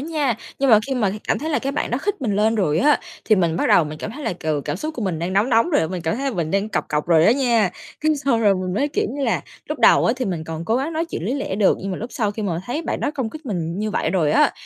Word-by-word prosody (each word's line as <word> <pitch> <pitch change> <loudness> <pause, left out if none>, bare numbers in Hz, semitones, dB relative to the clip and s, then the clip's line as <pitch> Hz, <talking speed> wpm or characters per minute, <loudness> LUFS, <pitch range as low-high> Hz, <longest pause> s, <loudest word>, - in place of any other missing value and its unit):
nha. 290 -6 -1 0.2
Nhưng 275 -1 +2
mà 215 - +8
khi 270 - -2
mà 215 -6 +1 0.2
cảm - - +2
thấy 315 +3 -3
là 295 - +2
cái 275 +1 -3
bạn 295 - -2
đó 245 - 0
khích 405 +2 -2
mình 210 -5 0
lên 220 +2 +3
rồi 170 -8 +1
á, 295 +2 +4 0.2
thì 215 - +4
mình 170 -3 +1
bắt - - 0
đầu 165 - +5
mình 150 0 -7
cảm - - -5
thấy 295 +2 -8
là, - - 0
ừ, 155 -2 -1
cảm 145 - -2
xúc 310 - -5
của 240 - -4
mình 180 -6 -1
đang 175 +3 -3
nóng 205 +6 +2
nóng 230 +8 +3
rồi 305 - +3
á, 160 - 0
mình 180 -1 -5
cảm 165 +4 -1
thấy 275 - -4
là 210 - -7
mình 160 -2 -1
đang 200 +3 0
cọc - - -2
cọc 150 +1 -1
rồi 165 -1 +5
á 220 - +6
nha. 240 -7 +2 0.3
Cái 310 0 +2
xong 275 -5 +1
rồi 205 -3 +4
mình 185 -1 -3
mới 280 +7 +1
kiểu - - -1
như 275 +2 -3
là - - 0 0.3
lúc - - -3
đầu - - +6
á - - +3
thì 255 - -2
mình 170 -5 -3
còn 160 +1 -5
cố 225 +6 +1
gắng 280 +6 -2
nói 320 +1 -1
chuyện 165 - -4
lý 240 - -1
lẽ 275 -8 -3
được, 205 -3 +3
nhưng 195 - -4
mà 185 - -3
lúc 235 +3 -6
sau 215 -7 0
khi 215 +1 -5
mà 175 -4 -2
thấy 285 +7 -2
bạn - - -3
đó - - 0
công 245 -5 -2
kích 310 +1 -10
mình 175 -5 -3
như 215 +1 -1
vậy - - -1
rồi 160 -6 +1
á, - - +4
215 Hz, 335 wpm, -21 LUFS, 180-275 Hz, 0.3 s, mà